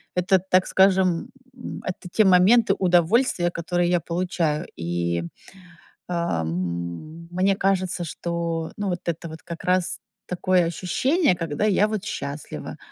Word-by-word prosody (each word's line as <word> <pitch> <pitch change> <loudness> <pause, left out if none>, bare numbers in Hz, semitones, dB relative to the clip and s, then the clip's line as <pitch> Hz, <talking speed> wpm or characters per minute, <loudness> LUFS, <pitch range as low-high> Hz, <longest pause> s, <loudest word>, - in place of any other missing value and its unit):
это, 185 +1 +3
так 185 0 +2
скажем, 190 -3 +3 0.3
м, 245 - -7
это 180 0 -5
те 215 - +4
моменты 195 +4 +5
удовольствия, 180 +2 +3
которые 175 +1 -1
я 175 -1 +2
получаю. 170 -2 -1
И, 85 0 -1
э, 85 - -11 0.7
м, 90 - -3
мне 190 +2 +2
кажется, 185 -2 0
что, 170 0 -3
ну, 205 -1 -2
вот 175 -1 -2
это 170 0 -3
вот 160 0 -10
как 170 -1 -8
раз 180 -1 +1 0.3
такое 180 0 +1
ощущение, 255 - +1
когда 165 +1 -2
я 210 0 +3
вот 215 -1 -3
счастлива. 140 -5 -6
175 Hz, 135 wpm, -24 LUFS, 165-190 Hz, 0.7 s, моменты